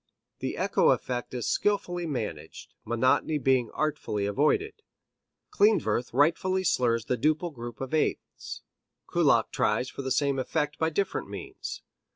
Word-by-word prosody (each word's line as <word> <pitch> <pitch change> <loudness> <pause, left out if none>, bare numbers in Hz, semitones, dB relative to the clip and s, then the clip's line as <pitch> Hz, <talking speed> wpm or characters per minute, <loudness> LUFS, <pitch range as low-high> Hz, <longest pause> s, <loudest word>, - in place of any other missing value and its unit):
The - - -3
echo - - +3
effect 125 -1 -1
is 120 - -3
skilfully 175 -4 0
managed, 110 - -5
monotony 130 +6 +2
being 130 -4 +2
artfully 125 -9 -2
avoided. 275 - +1 0.7
Klindworth 205 - +2
rightfully 170 +7 +2
slurs 115 -8 +1
the 125 - -1
duple 155 +5 +1
group 120 -2 -8
of 135 +1 -5
eighths; 155 - -2 0.4
Kullak - - +3
tries 110 +5 +1
for - - -6
the 130 - -3
same 140 +1 +1
effect 150 +3 -2
by 160 - +2
different 190 +4 -2
means. - - -7
140 Hz, 135 wpm, -28 LUFS, 120-165 Hz, 0.7 s, echo